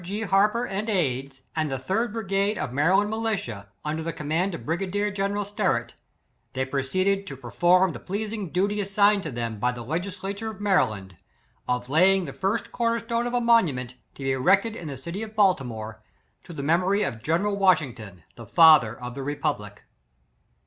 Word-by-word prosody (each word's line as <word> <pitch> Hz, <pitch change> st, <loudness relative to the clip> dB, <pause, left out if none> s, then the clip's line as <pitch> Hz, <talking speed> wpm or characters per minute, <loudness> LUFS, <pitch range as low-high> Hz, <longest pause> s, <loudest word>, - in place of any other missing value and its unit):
G. 200 Hz, +5 st, -4 dB
Harper 210 Hz, +4 st, +2 dB
and 205 Hz, +1 st, -3 dB
aids; 135 Hz, -, -1 dB
and 155 Hz, -2 st, 0 dB
the 135 Hz, -, -1 dB
third 205 Hz, -, -1 dB
brigade 200 Hz, -1 st, -1 dB
of 125 Hz, -, -4 dB
Maryland 190 Hz, +9 st, +3 dB
militia, 200 Hz, -, -3 dB, 0.2 s
un 150 Hz, +1 st, -1 dB
der -, -, -3 dB
the 165 Hz, +1 st, -3 dB
command 165 Hz, +4 st, -1 dB
of -, -, -9 dB
brigadier 195 Hz, +5 st, -1 dB
general 200 Hz, 0 st, -1 dB
Sterett; 190 Hz, -, -1 dB, 0.6 s
they 130 Hz, 0 st, -1 dB
proceeded 185 Hz, +9 st, 0 dB
to 135 Hz, -, -7 dB
perform 175 Hz, +9 st, +3 dB
the -, -, -7 dB
pleasing 210 Hz, 0 st, -4 dB
duty 200 Hz, +4 st, 0 dB
assigned 200 Hz, 0 st, +3 dB
them 115 Hz, -6 st, -4 dB
by 125 Hz, +2 st, +1 dB
the 120 Hz, -1 st, -7 dB
legis 175 Hz, -, -3 dB
lature 200 Hz, +3 st, -4 dB
of 215 Hz, -3 st, -9 dB
Maryland, 110 Hz, -, 0 dB, 0.5 s
of 125 Hz, 0 st, -1 dB
laying 185 Hz, +6 st, +4 dB
the -, -, -7 dB
first 220 Hz, +4 st, -2 dB
cor 230 Hz, -1 st, +1 dB
ner 230 Hz, -, -1 dB
stone 235 Hz, +1 st, -2 dB
of 245 Hz, -, -2 dB
a -, -, +3 dB
monument, 160 Hz, -, +2 dB, 0.2 s
to 140 Hz, -, -9 dB
be 135 Hz, -, 0 dB
erected 195 Hz, -, +2 dB
in 170 Hz, -, -7 dB
the 140 Hz, -2 st, -6 dB
city 170 Hz, -, -6 dB
of 220 Hz, -1 st, -7 dB
Baltimore, 120 Hz, -, 0 dB, 0.4 s
to -, -, -10 dB
the 145 Hz, -4 st, -6 dB
memory 180 Hz, +7 st, +2 dB
of 110 Hz, -, -4 dB
General 175 Hz, -, 0 dB
Washington, 125 Hz, -, +1 dB
the 115 Hz, -2 st, -10 dB
father 155 Hz, -, +6 dB
of 125 Hz, -1 st, -6 dB
the 140 Hz, -, -6 dB
republic. 135 Hz, -7 st, -3 dB
180 Hz, 185 wpm, -25 LUFS, 135-205 Hz, 0.6 s, father